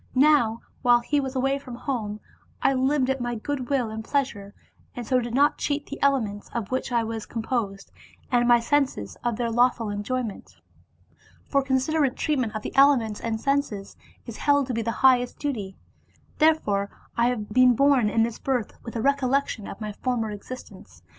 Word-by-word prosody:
Now 255 Hz, -5 st, +4 dB, 0.2 s
while 240 Hz, -1 st, +5 dB
he 290 Hz, +4 st, 0 dB
was 265 Hz, -1 st, -4 dB
away 270 Hz, +2 st, +1 dB
from 255 Hz, -3 st, -9 dB
home, 220 Hz, -5 st, -4 dB, 0.4 s
I -, -, +3 dB
lived 265 Hz, +1 st, +1 dB
at 265 Hz, -1 st, -3 dB
my 240 Hz, 0 st, -2 dB
good 255 Hz, +2 st, -4 dB
will 255 Hz, -6 st, 0 dB
and 220 Hz, 0 st, -5 dB
pleasure, 220 Hz, -7 st, -2 dB, 0.4 s
and 245 Hz, -, -5 dB
so 255 Hz, +3 st, +2 dB
did 240 Hz, -1 st, -4 dB
not 285 Hz, +2 st, +3 dB
cheat 290 Hz, 0 st, -1 dB
the 285 Hz, -, -8 dB
elements, 225 Hz, -8 st, 0 dB
of 225 Hz, -2 st, -3 dB
which 260 Hz, 0 st, -2 dB
I 235 Hz, -1 st, +2 dB
was 225 Hz, -1 st, -5 dB
composed, 220 Hz, -4 st, -3 dB, 0.4 s
and 240 Hz, -1 st, +3 dB
my 240 Hz, -1 st, +6 dB
senses, 245 Hz, -, 0 dB
of 240 Hz, -2 st, 0 dB
their 235 Hz, 0 st, -2 dB
lawful 240 Hz, -2 st, +2 dB
enjoyment. 215 Hz, +2 st, -4 dB, 0.9 s
For 275 Hz, -, +1 dB
considerate 270 Hz, +1 st, +1 dB
treatment 255 Hz, -8 st, -1 dB
of 215 Hz, -, -4 dB
the -, -, -6 dB
elements 265 Hz, -6 st, +4 dB
and 225 Hz, -1 st, -2 dB
senses 275 Hz, -7 st, -1 dB, 0.3 s
is 235 Hz, -, -8 dB
held 285 Hz, -1 st, +3 dB
to 255 Hz, -, -4 dB
be 230 Hz, -, -1 dB
the 230 Hz, -, -2 dB, 0.2 s
highest 250 Hz, -2 st, +4 dB
duty. 215 Hz, -10 st, -4 dB, 0.6 s
Therefore 210 Hz, -11 st, +2 dB, 0.3 s
I 235 Hz, 0 st, +3 dB
have 230 Hz, -4 st, -2 dB
been 255 Hz, 0 st, +6 dB
born 275 Hz, -4 st, +4 dB
in 225 Hz, +1 st, +2 dB
this 230 Hz, -1 st, -3 dB
birth 255 Hz, -5 st, -1 dB
with 230 Hz, -, -8 dB
a 225 Hz, -, -2 dB
recollection 275 Hz, -5 st, +1 dB
of -, -, -8 dB
my 215 Hz, -1 st, -4 dB
former 225 Hz, 0 st, -2 dB
existence. 230 Hz, +5 st, -10 dB
245 Hz, 180 wpm, -25 LUFS, 220-275 Hz, 0.9 s, my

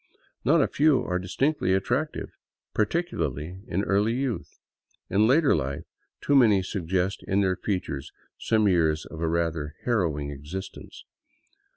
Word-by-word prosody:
Not 150 Hz, +2 st, +4 dB
a -, -, +1 dB
few 150 Hz, -2 st, +3 dB
are 90 Hz, 0 st, -1 dB
distinctly 95 Hz, +2 st, 0 dB
attractive, 130 Hz, +10 st, -1 dB, 0.4 s
particularly 95 Hz, -, -1 dB
in 95 Hz, -2 st, -1 dB
early 105 Hz, +3 st, +2 dB
youth. 130 Hz, -3 st, -3 dB, 0.5 s
In 105 Hz, +3 st, +4 dB
later 140 Hz, +3 st, +4 dB
life 70 Hz, -2 st, -3 dB, 0.4 s
too 145 Hz, -, +2 dB
many 110 Hz, -8 st, +5 dB
suggest 95 Hz, 0 st, -1 dB
|in 100 Hz, +1 st, +2 dB
their 95 Hz, -2 st, +2 dB
features 90 Hz, -9 st, -3 dB, 0.3 s
some 110 Hz, -2 st, +2 dB
years 80 Hz, -4 st, +2 dB
of 80 Hz, -, -9 dB
a 85 Hz, -, +1 dB
rather 80 Hz, -2 st, -1 dB
harrowing 80 Hz, -11 st, 0 dB
existence. 75 Hz, +7 st, -8 dB
95 Hz, 135 wpm, -26 LUFS, 80-120 Hz, 0.5 s, many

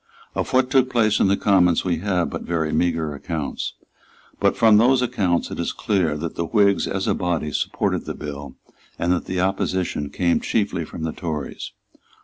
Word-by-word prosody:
Of -, -, -3 dB
what 130 Hz, 0 st, +2 dB
took 130 Hz, -2 st, +4 dB
place 110 Hz, -4 st, +2 dB
in -, -, +4 dB
the 100 Hz, +1 st, +2 dB
Commons 90 Hz, -4 st, +3 dB
we 90 Hz, -3 st, +1 dB
have 90 Hz, -2 st, 0 dB
but -, -, -4 dB
very 80 Hz, -2 st, -1 dB
meagre 80 Hz, -2 st, 0 dB
accounts; 75 Hz, +1 st, -4 dB, 0.7 s
but -, -, +2 dB
from 110 Hz, -2 st, +6 dB
those 125 Hz, +3 st, +4 dB
accounts 95 Hz, -8 st, 0 dB
it -, -, -6 dB
is -, -, -1 dB
clear 90 Hz, -8 st, 0 dB
that 80 Hz, +2 st, -4 dB
the 85 Hz, -, -2 dB
Whigs, 100 Hz, +3 st, +3 dB
as 95 Hz, 0 st, -2 dB
a -, -, +3 dB
body, 85 Hz, -5 st, -1 dB
supported -, -, -1 dB
the -, -, -5 dB
bill, 70 Hz, -2 st, -7 dB, 0.4 s
and 85 Hz, +1 st, 0 dB
that 90 Hz, -, -2 dB
the 95 Hz, -, -2 dB
opposition 95 Hz, -5 st, -1 dB
came 85 Hz, +1 st, +1 dB
chiefly 100 Hz, -6 st, -1 dB
from 80 Hz, +1 st, -6 dB
Tories. 75 Hz, -5 st, -5 dB
90 Hz, 180 wpm, -22 LUFS, 80-100 Hz, 0.7 s, from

